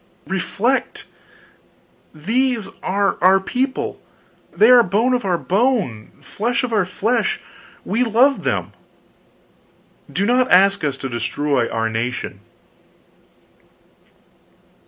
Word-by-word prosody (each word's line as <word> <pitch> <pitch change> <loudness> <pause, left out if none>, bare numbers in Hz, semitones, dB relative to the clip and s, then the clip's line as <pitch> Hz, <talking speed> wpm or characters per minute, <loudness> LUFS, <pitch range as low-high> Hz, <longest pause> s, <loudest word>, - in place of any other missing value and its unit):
reflect! 235 +7 -2 1.1
these 230 - -1
people 195 - -14
are 200 -1 -1
our 190 +1 +6
people, 260 +7 -3 0.5
they 220 +4 +5
are 250 -1 +8
bone 225 +5 +1
of 245 - 0
our 180 -3 0
bone, 195 - -1
flesh 235 +4 -2
of 245 -2 -3
our 200 -5 +1
flesh, 220 +6 -1 0.5
we 230 +5 0
love 250 +4 +2
them - - -2 1.4
do 200 - -1
not 250 +3 +2
ask 195 0 +4
us 140 -3 -1
to 135 - -5
destroy 130 +1 -1
our 115 0 -1
nation!" 115 +3 -4
200 Hz, 110 wpm, -19 LUFS, 175-245 Hz, 1.4 s, are